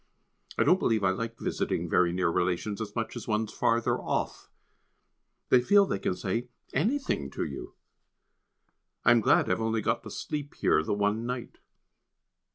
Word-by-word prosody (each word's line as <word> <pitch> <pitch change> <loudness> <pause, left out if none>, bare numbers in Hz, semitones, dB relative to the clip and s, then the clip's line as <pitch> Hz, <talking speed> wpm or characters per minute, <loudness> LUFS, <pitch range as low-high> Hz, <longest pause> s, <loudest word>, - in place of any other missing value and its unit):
I - - +4
don't 185 - +4
believe 110 -3 +1
I 95 - +4
like 115 +4 -4
visiting - - -2
very 90 -1 +3
near 90 -1 +1
relations 90 +5 -1
as 105 -2 -6
much 115 0 -3
as 120 - -7
ones 110 0 -1
further 115 0 +1
off. - - -3 1.0
They 125 - +6
feel 200 +9 +5
they 100 - -2
can 90 - -1
say 115 +7 -2 0.3
anything 210 - 0
to - - -3
you. 70 - -7 1.3
I 120 - +7
am 120 -1 +5
glad - - +4
I - - -5
have 90 +4 +1
only 110 -1 0
got - - 0
to - - -9
sleep 145 -1 -5
here - - +3
the 80 - -1
one 105 +3 0
night. 125 -1 -5
110 Hz, 170 wpm, -28 LUFS, 95-120 Hz, 1.3 s, I